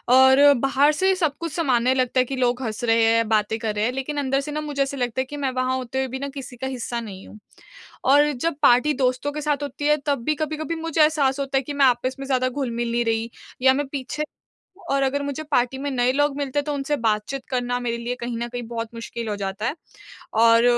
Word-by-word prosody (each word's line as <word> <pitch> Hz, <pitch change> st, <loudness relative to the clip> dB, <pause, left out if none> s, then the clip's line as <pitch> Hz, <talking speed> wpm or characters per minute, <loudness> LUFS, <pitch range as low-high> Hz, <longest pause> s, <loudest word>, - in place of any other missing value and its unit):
और 265 Hz, +2 st, +7 dB
बाहर 275 Hz, +3 st, +3 dB
से 380 Hz, +4 st, +3 dB
सब 320 Hz, -6 st, 0 dB
कुछ 335 Hz, -1 st, -4 dB
सामान्य 255 Hz, -6 st, +2 dB
लगता 255 Hz, 0 st, +1 dB
है 255 Hz, -, +5 dB
कि 270 Hz, -, -4 dB
लोग 250 Hz, 0 st, 0 dB
हँस 220 Hz, +1 st, -4 dB
रहे 230 Hz, -1 st, +3 dB
हैं, 230 Hz, 0 st, +3 dB
बातें 215 Hz, 0 st, +1 dB
कर 215 Hz, -1 st, -2 dB
रहे 210 Hz, +1 st, +1 dB
हैं 245 Hz, -, +1 dB
लेकिन 270 Hz, +3 st, -4 dB
अंदर 270 Hz, -1 st, +1 dB
से 295 Hz, +2 st, -6 dB
ना 305 Hz, +1 st, -2 dB
मुझे 295 Hz, -2 st, -3 dB
ऐसे 275 Hz, 0 st, -5 dB
लगता 245 Hz, 0 st, -1 dB
है -, -, -3 dB
कि 290 Hz, +3 st, -8 dB
मैं 275 Hz, -2 st, -1 dB
वहाँ 255 Hz, 0 st, 0 dB
होते 255 Hz, 0 st, -5 dB
हुए 265 Hz, 0 st, 0 dB
भी 260 Hz, +1 st, -5 dB
ना 280 Hz, +1 st, -4 dB
किसी 265 Hz, -2 st, -7 dB
का 265 Hz, -, -4 dB
हिस्सा 245 Hz, -2 st, -4 dB
नहीं 200 Hz, -4 st, -9 dB
हूँ। 215 Hz, -, -13 dB, 0.7 s
और 290 Hz, +2 st, +5 dB
जब 290 Hz, +5 st, -2 dB
पार्टी 280 Hz, +3 st, +5 dB
दोस्तों 255 Hz, +3 st, 0 dB
के 300 Hz, +1 st, -5 dB
साथ 295 Hz, -1 st, -1 dB
होती 290 Hz, +1 st, -3 dB
है 300 Hz, 0 st, +4 dB
तब 280 Hz, -5 st, 0 dB
भी 305 Hz, -, +1 dB
कभी-कभी 310 Hz, +2 st, -3 dB
मुझे 330 Hz, -1 st, 0 dB
एहसास 290 Hz, -3 st, +3 dB
होता 275 Hz, -1 st, 0 dB
है 265 Hz, -, +2 dB
कि 290 Hz, -, -5 dB
मैं 280 Hz, -1 st, +4 dB
आपस 255 Hz, +1 st, +1 dB
में 275 Hz, -, -5 dB
ज़्यादा 255 Hz, -1 st, +1 dB
घुल-मिल 240 Hz, -3 st, -2 dB
नहीं 235 Hz, 0 st, 0 dB
रही 225 Hz, 0 st, 0 dB, 0.3 s
या 260 Hz, 0 st, +6 dB
मैं 285 Hz, +1 st, -1 dB
पीछे 280 Hz, +2 st, -4 dB, 0.7 s
और 275 Hz, 0 st, +2 dB
अगर 280 Hz, +1 st, 0 dB
मुझे 285 Hz, +2 st, -4 dB
पार्टी 250 Hz, -1 st, +2 dB
में 285 Hz, +1 st, -2 dB
नए 250 Hz, -1 st, +2 dB
लोग 290 Hz, 0 st, +1 dB
मिलते 285 Hz, 0 st, -1 dB
हैं, 285 Hz, -, -1 dB
तो 295 Hz, -, -2 dB
उनसे 285 Hz, +1 st, -1 dB
बातचीत 225 Hz, +3 st, -1 dB
करना 245 Hz, -1 st, -1 dB
मेरे 235 Hz, -1 st, -2 dB
लिए 235 Hz, +1 st, -3 dB
कहीं 235 Hz, 0 st, -3 dB
न 235 Hz, +1 st, -3 dB
कहीं 245 Hz, 0 st, -5 dB
बहुत 230 Hz, -1 st, -4 dB
मुश्किल 230 Hz, 0 st, -6 dB
हो 210 Hz, -, -1 dB
जाता 195 Hz, +1 st, -4 dB
है। 295 Hz, -, -1 dB, 0.7 s
और 230 Hz, 0 st, +6 dB
265 Hz, 250 wpm, -23 LUFS, 240-285 Hz, 0.7 s, और